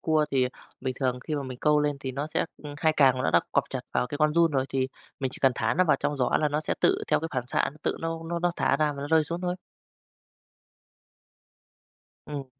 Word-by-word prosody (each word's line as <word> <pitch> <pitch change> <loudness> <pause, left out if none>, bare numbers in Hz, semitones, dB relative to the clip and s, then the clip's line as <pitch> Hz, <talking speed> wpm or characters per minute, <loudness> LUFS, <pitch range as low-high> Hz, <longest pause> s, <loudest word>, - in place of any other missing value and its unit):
Cua 155 -1 +2
thì 130 -2 +3 0.3
bình 130 -1 -2
thường 125 -1 0
khi 155 - -4
mà 145 - -1
mình 130 -2 -7
câu 150 -1 +4
lên 145 -1 0
thì 130 -1 -4
nó 140 +3 -3
sẽ 155 - 0 0.2
ơ, 145 -1 -7
hai 155 +1 +2
càng 135 -3 +5
nó - - +1
đã 85 - +5
quặp - - +2
chặt - - -3
vào 125 - +1
cái 145 +3 -5
con 155 0 +3
giun 170 -1 +4
rồi 135 -2 +1
thì 130 -1 0 0.3
mình 130 - -1
chỉ - - -10
cần 135 -1 +5
thả - - 0
nó 185 +2 +4
vào 155 - +4
trong 145 - -1
giỏ 125 -2 +1
là 150 - +2
nó 150 +1 0
sẽ 155 - -1
tự - - +4
theo - - +3
cái 165 - -3
phản 125 -1 -1
xạ - - +1
nó, 150 - -17
tự - - 0
nó 165 0 -2
nó 170 +1 -2
nó 175 +1 +1
thả - - +2
ra 150 0 +1
và 140 - -6
nó 145 - -4
rơi 160 0 +4
xuống 170 +3 -4
thôi. 180 0 -1 2.7
Ừm. 145 -2 -5
145 Hz, 255 wpm, -27 LUFS, 130-155 Hz, 2.7 s, càng